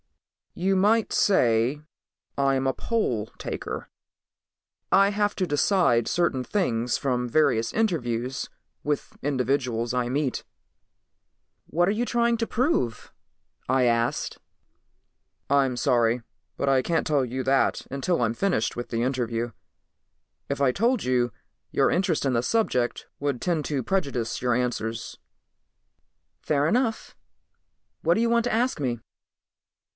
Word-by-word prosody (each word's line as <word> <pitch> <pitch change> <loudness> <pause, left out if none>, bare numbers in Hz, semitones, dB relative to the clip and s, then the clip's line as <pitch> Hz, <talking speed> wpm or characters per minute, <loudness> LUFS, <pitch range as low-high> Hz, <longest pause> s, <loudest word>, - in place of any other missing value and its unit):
"You 190 +2 +1
might 210 +4 +3
say 125 - +3 0.6
I'm 135 -1 +2
a 130 - +2
poll 125 - -1
taker. - - -5 1.0
I 195 +1 +6
have 205 0 0
to 185 - -1
decide 145 - +2
certain 170 -7 +1
things 125 - 0
from 125 -2 -1
various 125 -5 +2
interviews 130 - -1 0.3
with 145 -1 -2
individuals 125 -4 0
I 125 -1 0
meet." 140 0 -1 1.2
"What 175 +2 +1
are - - +3
you 225 +3 0
trying 235 -1 +2
to 230 0 -1
prove?" 230 - -1 0.6
I 130 0 +3
asked. 115 -1 0 1.1
"I'm 135 -3 +2
sorry, 120 -2 +2 0.4
but 140 - -1
I 135 -1 +4
can't 165 +5 0
tell 145 -3 +2
you 130 +1 -3
that 135 +1 +1
until 140 +4 -1
I'm 115 -1 +1
finished 175 - 0
with 120 - -5
the 115 0 -1
interview. 120 -2 -1 1.0
If 140 - -2
I 140 -2 +3
told 235 - +1
you, 125 -1 +1 0.4
your - - +2
interest 180 -5 +1
in 135 - +1
the 115 0 +1
subject 125 - 0
would 140 -3 -1
tend 165 +2 0
to 140 -4 -1
prejudice 135 -10 -1
your 125 -1 +2
answers." 115 -2 -2 1.2
"Fair 145 0 +1
enough. 230 +4 0 0.9
What 170 +2 +3
do 225 - +1
you 235 - +2
want 235 0 +3
to 245 - 0
ask 240 - 0
me?" 120 -4 -1
135 Hz, 130 wpm, -26 LUFS, 120-185 Hz, 1.2 s, I